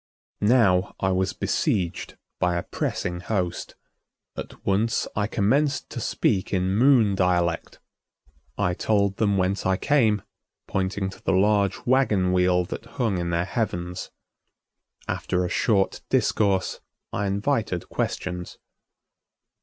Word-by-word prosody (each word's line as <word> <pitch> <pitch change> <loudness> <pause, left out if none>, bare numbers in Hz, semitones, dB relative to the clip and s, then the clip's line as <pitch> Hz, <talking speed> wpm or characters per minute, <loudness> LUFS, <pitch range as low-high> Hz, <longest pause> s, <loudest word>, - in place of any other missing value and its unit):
Now 100 -7 +3
I 95 - +1
was 95 +1 +1
besieged 90 -3 -1 0.2
by 90 -1 +1
a 85 - -1
pressing 90 0 -3
host. 90 -2 -3 0.6
At - - -9
once 105 +4 +1
I 105 0 0
commenced 135 +8 +1
to - - -5
speak 100 -3 0
in 95 0 +1
Moon 120 -3 +5
dialect. 90 -3 0 0.8
I 90 - +1
told 100 0 +1
them 100 -3 +2
whence 95 +2 0
I 95 0 +1
came, 110 -8 +2 0.4
pointing 95 0 -1
to - - -14
the - - +1
large 100 +1 +2
wagon 105 -8 +2
wheel 90 -1 +3
that 110 +5 -7
hung 110 -8 +1
in 85 0 -2
their 85 +1 0
heavens. 90 -3 -3 1.0
After 90 0 -1
a - - -3
short 100 -1 +1
discourse, 100 -3 +1 0.3
I 100 0 -1
invited 100 -2 -1
questions. 90 -1 -3
95 Hz, 125 wpm, -25 LUFS, 90-105 Hz, 1.0 s, Moon